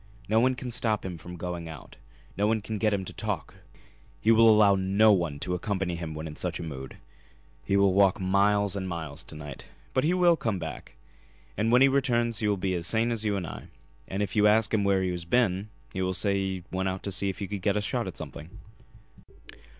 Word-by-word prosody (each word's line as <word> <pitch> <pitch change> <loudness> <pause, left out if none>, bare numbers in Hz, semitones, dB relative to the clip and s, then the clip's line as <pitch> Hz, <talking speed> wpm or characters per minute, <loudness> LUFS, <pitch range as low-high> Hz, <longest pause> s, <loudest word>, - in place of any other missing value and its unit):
No 110 +2 +3
one 130 +2 +3
can 125 0 -6
stop 110 -3 0
him 90 -3 -5
from 90 +2 -9
going 85 -1 -5
out; 80 -4 -11 0.4
no 105 +2 +1
one 110 0 +2
can 105 0 -5
get 110 0 +2
him 100 -2 -1
to - - -7
talk; - - -3 0.7
he 110 - +3
will 115 0 +7
allow 105 -2 +6
no 100 +3 +4
one 85 -7 +1
to 90 - -2
accompany 95 0 -2
him 85 -2 -6
when 80 +1 -5
in 75 -1 -7
such 90 +1 -3
a - - -5
mood. 65 -5 -7 0.7
He 100 +11 +1
will 100 -1 +4
walk 95 -1 +4
miles 100 +1 +2
and 95 -2 -3
miles 80 -2 -5
to - - -9
night. 75 -3 -9 0.3
But 130 - +2
he 170 +4 +2
will 175 -2 +5
come 110 -10 -2
back. 80 -7 -7 0.6
And 110 +3 0
when 125 +2 +6
he - - +7
returns 120 -5 +1
he 110 - 0
will 100 -1 +1
be 95 0 -1
as 85 -1 -2
sane 115 +3 +1
as 115 -2 -2
you 105 -2 0
and 95 -3 -3
I, - - -8 0.4
and 100 +2 -2
if 95 -2 -4
you 105 -1 +5
ask 110 +1 +3
him 105 -2 +2
where 100 -1 +2
he 90 - 0
has 90 -1 -4
been 100 0 +1 0.2
he - - -2
will 95 0 -1
say 100 - +1
that 100 - +1
he 95 -2 -3
went 95 0 -1
out 95 0 -5
to 100 - -3
see 100 +1 0
if 95 - -4
he 100 - -4
could 100 -1 -5
get 100 +2 +1
a - - +2
shot 100 - -2
at - - -7
something." 80 - -8
100 Hz, 240 wpm, -27 LUFS, 90-110 Hz, 0.7 s, will